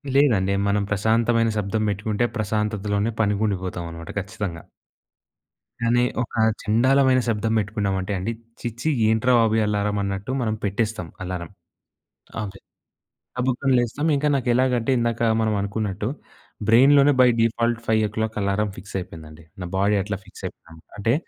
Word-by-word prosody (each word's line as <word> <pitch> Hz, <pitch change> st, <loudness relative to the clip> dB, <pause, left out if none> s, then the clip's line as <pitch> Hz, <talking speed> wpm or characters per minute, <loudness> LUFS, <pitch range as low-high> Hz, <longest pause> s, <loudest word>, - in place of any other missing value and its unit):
లేదండి. 110 Hz, -9 st, +3 dB
మనం 100 Hz, 0 st, +1 dB
ప్రశాంతమైన 115 Hz, +2 st, +2 dB
శబ్దం 105 Hz, +2 st, -1 dB
పెట్టుకుంటే 105 Hz, +3 st, -1 dB
ప్రశాంతతలోనే 105 Hz, 0 st, -1 dB
పనికుండిపోతామనమాట 95 Hz, -5 st, -2 dB
ఖచ్చితంగా. 95 Hz, -3 st, -5 dB, 1.2 s
కానీ 120 Hz, +1 st, +2 dB, 0.2 s
ఒక -, -, -10 dB, 0.3 s
చెండాలమైన 130 Hz, +4 st, +4 dB
శబ్దం 110 Hz, 0 st, 0 dB
పెట్టుకున్నామంటే 100 Hz, -2 st, -2 dB
అండి, 100 Hz, +6 st, -2 dB, 0.3 s
ఛీ! -, -, -3 dB
ఛీ! 155 Hz, -, +1 dB, 0.2 s
ఏంట్రా 110 Hz, +3 st, +3 dB
బాబు 115 Hz, -1 st, +3 dB
ఈ -, -, +2 dB
అలారం 105 Hz, 0 st, 0 dB
అన్నట్టు 100 Hz, +5 st, -3 dB
మనం 110 Hz, -2 st, 0 dB
పెట్టేస్తాం 100 Hz, -2 st, -1 dB, 0.2 s
అలారం 90 Hz, -2 st, -5 dB, 0.9 s
అవి. 100 Hz, -1 st, -7 dB, 0.8 s
గబుక్కన 130 Hz, +1 st, 0 dB
లేస్తాం 120 Hz, +6 st, -1 dB
ఇంక 140 Hz, +1 st, -1 dB
నాకెలాగంటే, 125 Hz, 0 st, +1 dB
ఇందాక 115 Hz, -1 st, -1 dB, 0.2 s
మనవనుకున్నట్టు, 105 Hz, -1 st, -1 dB, 0.6 s
బ్రెయిన్‌లోనే 140 Hz, +5 st, +6 dB
బై 125 Hz, -, +7 dB
డిఫాల్ట్ 115 Hz, 0 st, +1 dB
5:00 110 Hz, 0 st, 0 dB
అలారం 100 Hz, +2 st, 0 dB
ఫిక్సయిపోయిందండి. 85 Hz, -5 st, -8 dB, 0.2 s
నా -, -, -3 dB
బాడీ 100 Hz, +2 st, +2 dB
అట్లా 105 Hz, 0 st, -3 dB
ఫిక్సయిపోయింది. 80 Hz, -1 st, -10 dB
అంటే, 110 Hz, +3 st, +1 dB
105 Hz, 120 wpm, -23 LUFS, 100-115 Hz, 1.2 s, బై